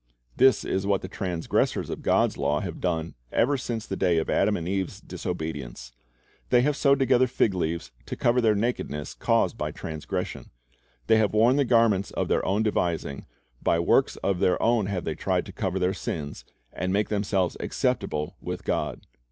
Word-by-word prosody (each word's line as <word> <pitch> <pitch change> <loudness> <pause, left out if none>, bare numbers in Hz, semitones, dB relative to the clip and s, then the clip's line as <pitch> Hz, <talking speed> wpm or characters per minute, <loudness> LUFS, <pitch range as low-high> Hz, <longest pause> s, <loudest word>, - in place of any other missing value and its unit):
This 130 -3 +5
is 95 +1 -1
what 100 -2 +1
the - - -4
transgressors 90 -3 -1
of - - -5
God's - - +2
law 75 +1 0
have 85 -4 -6
done 85 -2 -1 0.2
ever 140 +5 +2
since 120 -4 -3
the 95 - -4
day 90 -3 +2
of 80 - 0
Adam 105 - +2
and 85 - -5
Eve's 95 -1 -2
disobedience. 80 -8 -5 0.6
They 125 -1 +5
have 150 +1 +2
sewed 140 -1 +4
together 130 -1 +4
fig 115 -4 +1
leaves 85 -2 -2 0.2
to - - -4
cover 120 +1 +2
the 110 -2 +3
nakedness 100 - -2
caused - - +1
by - - -1
transgression. 80 -1 -5 0.6
They 110 - +5
have 110 -1 +1
worn 120 +5 +5
the 140 - +3
garments 115 -5 +3
of - - -2
their - - +2
own 100 +3 +1
devising, 85 -9 -1 0.3
by 85 - +2
works 85 - +3
of 95 -2 +1
their 90 - +2
own 115 -2 +2
they 100 - -3
have 90 -3 -3
tried - - 0
to - - -9
cover 95 0 -2
their 95 0 +1
sins, 75 -6 -5 0.3
and 90 +2 -2
make 105 +2 +1
themselves 100 -3 0
acceptable 75 0 -1
with - - -5
God. - - -2
95 Hz, 185 wpm, -26 LUFS, 85-115 Hz, 0.6 s, This